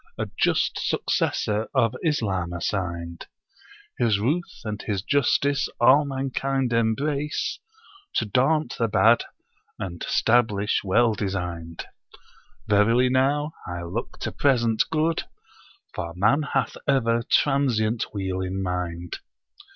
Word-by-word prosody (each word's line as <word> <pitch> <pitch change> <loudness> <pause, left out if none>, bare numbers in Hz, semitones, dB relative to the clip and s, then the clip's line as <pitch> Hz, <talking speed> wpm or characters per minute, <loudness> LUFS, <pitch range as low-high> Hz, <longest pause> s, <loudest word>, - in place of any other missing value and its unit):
A - - -2
just - - +1
successor 105 +1 0
of 115 +1 +2
Islam 95 - 0
assigned. 85 -2 -4 0.7
His 115 -4 +3
ruth 150 - -2
and 105 -1 -4
his 100 -4 -3
justice 140 +1 +1
all 135 +5 +6
mankind 135 -1 -1
embrace. 140 +6 0 0.6
To 110 - +1
daunt 130 +6 +1
the 115 - +2
bad 115 +2 +4 0.5
and 85 -3 -6
stablish 110 -3 +2
well 115 +4 +3
designed. 90 -5 -4 0.8
Verily 115 +5 +4
now, 145 +4 +1
I 90 0 -5
look 95 +8 -5
to - - -2
present 120 -5 +2
good, 160 +1 0 0.7
for 85 0 -5
man 110 +11 +3
hath - - 0
ever 120 -4 +2
transient 120 -4 +1
weal 95 -2 -3
in 95 +1 -3
mind.' 90 -1 -4
115 Hz, 110 wpm, -24 LUFS, 95-135 Hz, 0.8 s, all